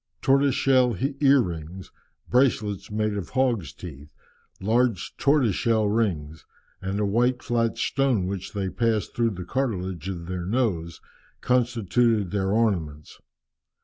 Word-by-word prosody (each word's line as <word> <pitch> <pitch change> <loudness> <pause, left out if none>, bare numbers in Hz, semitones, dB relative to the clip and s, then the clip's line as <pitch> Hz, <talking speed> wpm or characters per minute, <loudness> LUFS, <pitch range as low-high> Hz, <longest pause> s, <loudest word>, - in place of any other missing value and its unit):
Tortoise 135 0 +3
shell 130 -5 +3 0.2
ear 140 -2 +5
rings, 85 0 -6 0.4
bracelets 115 -6 +1
made 105 0 -1
of 100 -4 -4
hogs' 120 - 0
teeth, 75 -3 -10 0.5
large 115 0 0
tortoise 140 -7 +3
shell 115 -4 +1
rings, 80 - -1 0.4
and 95 +2 -3
a 105 - +1
white 120 +5 +1
flat 115 -1 0
stone 135 -8 +1
which 95 0 -5
they 100 -2 -2
passed 115 -3 -1
through 115 -1 +2
the 90 0 -6
cartilage 95 - -2
of 85 -3 -5
the 90 +1 -4
nose, 90 -4 -2 0.4
constituted 120 -4 +1
their 95 -2 0
ornaments. 85 -10 -1
105 Hz, 130 wpm, -25 LUFS, 90-120 Hz, 0.5 s, ear